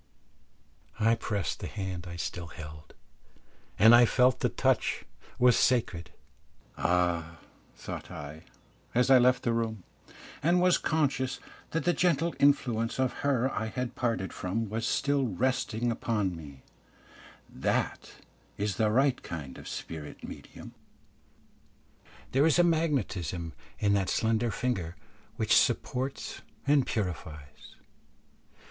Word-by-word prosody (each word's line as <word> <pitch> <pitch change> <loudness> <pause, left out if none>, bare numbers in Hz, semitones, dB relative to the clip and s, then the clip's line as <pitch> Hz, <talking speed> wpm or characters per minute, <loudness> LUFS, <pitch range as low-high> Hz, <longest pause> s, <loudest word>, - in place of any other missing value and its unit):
I 115 +1 +4
pressed 105 -4 -2
the - - -5
hand 95 -3 -5
I 85 - -7
still 85 0 -4
held, 75 -1 -11 0.8
and 110 +3 +8
I 120 0 +8
felt 125 +1 +3
the - - +1
touch - - 0 0.3
was 125 -1 +5
sacred. 90 -10 +1 0.7
"Ah," 85 -2 0 0.4
thought - - -7
I, 75 +2 -8 0.5
as 125 +2 +3
I 130 - +8
left 125 +1 +3
the 120 - +1
room, 110 -4 -2 0.6
and 175 +4 +3
was 180 0 +4
conscious 140 -4 0 0.3
that 165 -1 -1
the 175 - +3
gentle 170 -1 +1
influence 120 -5 +2
of 130 -1 +1
her 135 -2 +1
I 110 - -2
had 125 +2 -4
parted 115 -6 -2
from 105 +4 -3
was 115 +1 -1
still 140 -2 +1
resting 120 +1 0
upon 105 -5 -1
me, 70 -5 -11 0.8
"that - - -2 0.4
is 100 -2 -2
the 110 -1 +3
right 130 +3 +2
kind 70 -6 -7
of - - -11
spirit 75 -3 -7
medium. - - -10 1.6
There 140 +4 +4
is 160 - +3
a 175 - +6
magnetism 125 - 0 0.2
in 100 -1 +2
that 95 -3 +1
slender 115 +1 +1
finger 95 -7 -2 0.4
which 110 -3 +2
supports 130 +2 0 0.2
and 140 -1 +3
purifies." 80 -7 -5
115 Hz, 125 wpm, -29 LUFS, 90-130 Hz, 1.6 s, and